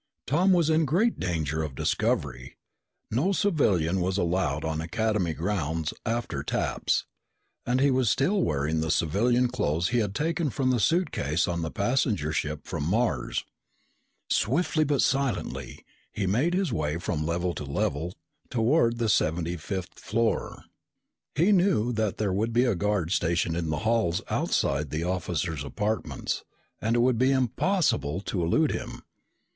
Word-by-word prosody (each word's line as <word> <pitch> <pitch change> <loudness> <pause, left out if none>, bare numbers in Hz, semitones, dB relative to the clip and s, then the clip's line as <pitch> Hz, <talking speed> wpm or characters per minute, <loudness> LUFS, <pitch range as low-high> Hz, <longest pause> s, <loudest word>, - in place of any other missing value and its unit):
Tom 175 +9 +3
was 170 -3 +3
in 160 0 +3
great 190 - +1
danger 80 -4 -1
of 75 -4 -4
discovery. - - -1 0.5
No 140 - +1
civilian 100 - +2
was 95 +2 0
allowed 85 -5 0
on 80 0 -2
Academy 100 -1 0
grounds 80 -3 -2
after 115 +1 -2
taps. - - -1 0.6
And 125 +2 +2
he 140 +1 +4
was 130 -3 +2
still 185 - +2
wearing 75 - 0
the 80 - -2
civilian 120 +12 +2
clothes 90 -8 0
he 120 - +2
had 105 -3 -1
taken 165 +2 0
from 130 +1 0
the 125 - +1
suitcase 95 - +1
on 85 -1 -1
the 80 - -2
passenger 100 - 0
ship 75 -1 -3
from 85 -5 -4
Mars. 90 - 0 0.8
Silently 155 - +1
but 145 -2 +2
swiftly, 135 -5 -2 0.3
he 100 - -2
made 130 - +1
his 185 -9 0
way 75 0 -1
from 80 -2 -2
level 85 +2 -1
to - - -6
level 70 +4 -2 0.3
toward 120 0 +2
the 115 -1 0
seventy 85 -3 +1
fifth 95 +2 -5
floor. 115 +1 -1 0.7
He 170 +8 +4
knew 175 - +3
that 110 -3 -1
there 100 -3 0
would 110 +4 0
be 120 +2 +4
a 120 - +2
guard 100 -3 0
stationed 85 -2 +1
in 85 -2 -2
the 75 - -1
halls 110 -7 +1
outside 70 +1 0
the 80 +3 -2
officers' 85 -4 -2
apartments 105 +5 -2 0.4
and 115 +2 +1
it 120 - +3
would 120 -2 +2
be 130 +1 +4
impossible 130 - +1
to 95 -2 -2
elude 145 - +2
him. - - -5
105 Hz, 155 wpm, -27 LUFS, 80-130 Hz, 0.8 s, he